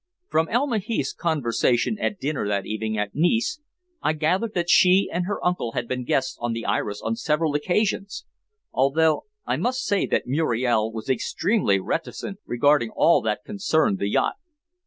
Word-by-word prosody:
From 160 +1 +1
Elma 245 -1 +1
Heath's 205 - -2
conversation 145 - 0
at 205 - -1
dinner 145 -7 -2
that 100 -2 -1
evening 110 0 -3
at 105 -1 -2
Nice 225 - +1 0.4
I 155 - +1
gathered 180 +8 0
that 175 -1 0
she 185 +2 +5
and 175 +1 -1
her 205 - -1
uncle 180 -10 0
had 120 - -2
been 125 0 -3
guests 130 +1 0
on 120 -1 -1
the 115 0 -5
Iris 105 0 -2
on 115 - -1
several 150 +3 0
occasions, 195 +6 -1 0.5
although 155 +4 +2 0.2
I - - 0
must 255 +1 -1
say 200 -2 +1
that - - 0
Muriel 120 -5 +1
was 110 -1 -7
extremely 135 - +1
reticent 170 - -4
regarding 120 0 +3
all 170 - +4
that 110 +3 -2
concerned 160 - +1
the 100 - -1
yacht." - - +1
150 Hz, 165 wpm, -24 LUFS, 115-185 Hz, 0.5 s, she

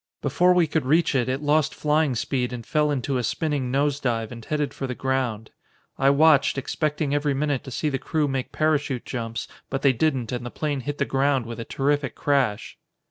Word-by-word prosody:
Before 180 0 +3
we 175 -2 +4
could 160 0 -1
reach 160 +4 +3
it 130 -2 +1
it 135 +3 -2
lost 150 0 +2
flying 150 -3 +1
speed 125 +1 -1
and 120 -2 -6
fell 150 +7 +1
into 135 -1 -1
a - - -2
spinning 145 0 -1
nose 140 +2 +1
dive 115 -4 -1
and 115 -1 -9
headed 145 +1 -2
for 135 - -4
the 125 - -4
ground. 125 -5 -2 0.5
I 135 - +5
watched, 140 -1 +4
expecting 150 +1 -1
every 145 -1 +1
minute 145 -1 -1
to - - -7
see 140 +4 -2
the 135 -2 -1
crew 155 +1 0
make 135 -2 -3
parachute 150 -5 0
jumps, 115 -3 -4 0.2
but 135 0 -3
they 135 -2 +5
didn't 130 -3 0
and 125 -1 -3
the 120 - -5
plane 145 +1 -2
hit 145 +3 -4
the - - +1
ground 135 -2 +1
with 115 0 -7
a 115 - -5
terrific 140 -1 -1
crash." 135 -8 0
140 Hz, 210 wpm, -24 LUFS, 125-150 Hz, 0.5 s, I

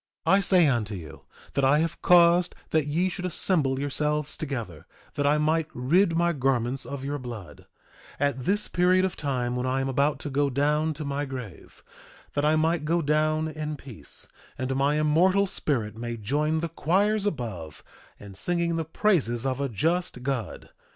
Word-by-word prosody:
2:28 - - +4
I 195 - +6
say 185 -3 +4
unto 115 -6 0
you 80 -6 -10 0.3
that 140 - 0
I 135 +2 +5
have 165 +1 -1
caused 175 0 +5 0.2
that 155 -2 +2
ye 165 +5 +1
should 185 0 -5
assemble 150 -7 0
yourselves 150 +1 -1
together 115 - -5 0.3
that 145 0 0
I 150 +1 +4
might 155 +1 +1
rid 165 +8 +2
my 170 0 +2
garments 130 -2 0
of 135 0 -6
your 145 +1 -3
blood, 120 -7 -9 0.5
at 140 -3 0
this 205 +2 +1
period 185 +1 +3
of 190 - -3
time 125 -4 -2
when 125 +1 -2
I 130 +1 0
am 135 - -1
about 140 +3 +1
to 145 - -5
go 140 +1 +1
down 150 +3 +1
to 150 - -6
my 140 +1 -2
grave, 125 - -9 0.5
that 145 - 0
I 155 +1 +3
might 160 0 +1
go 165 +2 +1
down 155 +1 +1
in 155 -1 -4
peace, 130 -6 -11 0.3
and 130 +1 -2
my 140 +2 +2
immortal 180 +6 +3
spirit 120 - -2
may 120 +1 -5
join 150 +8 0
the 170 - -2
choirs 200 +6 +1
above 105 - -5 0.4
in 100 -1 -11
singing 170 - -1
the 165 - -2
praises 150 - +1
of 135 0 -1
a 140 - -1
just 160 - -1
God. 125 -5 -4
145 Hz, 180 wpm, -26 LUFS, 130-165 Hz, 0.5 s, I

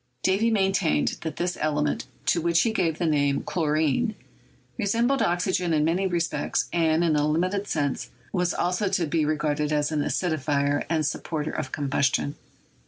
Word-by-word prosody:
Davy 195 +5 +2
maintained 190 - +1
that 160 -3 -4
this 175 +1 -1
element, 150 -1 0 0.2
to 170 - +2
which 170 +1 +3
he 230 - 0
gave 165 -6 0
the 175 - -1
name 145 -3 +1
"chlorine," 160 - 0 0.6
resembled 235 +5 +1
oxygen 175 0 +1
in 150 -1 +2
many 180 +4 +1
respects, 170 -2 -1
and, 165 -1 +2
in 160 -3 +2
a 150 0 +2
limited 185 +6 0
sense, 145 -6 -1 0.2
was 180 -1 +1
also 180 +3 0
to 175 -2 +1
be 155 0 0
re 155 +1 +1
garded 150 0 -1
as 150 0 +1
an 150 -2 0
acidifier 145 -4 0
and 160 -2 +1
supporter 155 +1 -3
of 130 - -4
combustion. 140 0 0
160 Hz, 165 wpm, -25 LUFS, 150-180 Hz, 0.6 s, which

